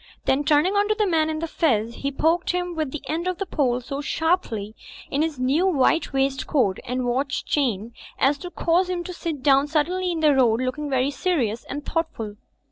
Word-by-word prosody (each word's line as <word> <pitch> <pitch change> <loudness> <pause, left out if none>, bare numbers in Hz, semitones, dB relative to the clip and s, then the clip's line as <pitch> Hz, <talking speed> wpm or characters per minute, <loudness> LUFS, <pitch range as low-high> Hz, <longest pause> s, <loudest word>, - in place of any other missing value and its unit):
Then 270 +2 +2
turning 305 +5 +3
on 405 0 +3
the 425 - +2
man 320 -4 +2
in 310 - -2
the 330 +1 -3
fez 235 -9 +1
he 280 - -2
poked 320 +5 +1
him 355 0 -2
with 310 -4 -2
the 295 +2 -6
end 330 +4 -2
of 365 -1 -1
the 390 - -3
pole 255 -8 0
so 275 +3 -5
sharply 285 - -1 0.4
in 280 - +1
his 315 -3 -1
new 275 +9 +2
white 325 -1 +2
waistcoat 270 -6 +1
and 250 +1 -2
watch 265 +3 -1
chain 235 -6 -1 0.2
as 280 +1 +2
to 355 - -6
cause 355 +1 +1
him 355 -1 -2
to 360 - -6
sit 325 -6 -5
down 275 0 +4
suddenly 355 +5 0
in 335 - -2
the 300 -2 +5
road, 240 -4 +3
looking 255 +4 -2
very 265 +1 +1
serious 275 - -1
and 285 0 -6
thoughtful. 225 -11 -3
290 Hz, 205 wpm, -24 LUFS, 255-335 Hz, 0.4 s, the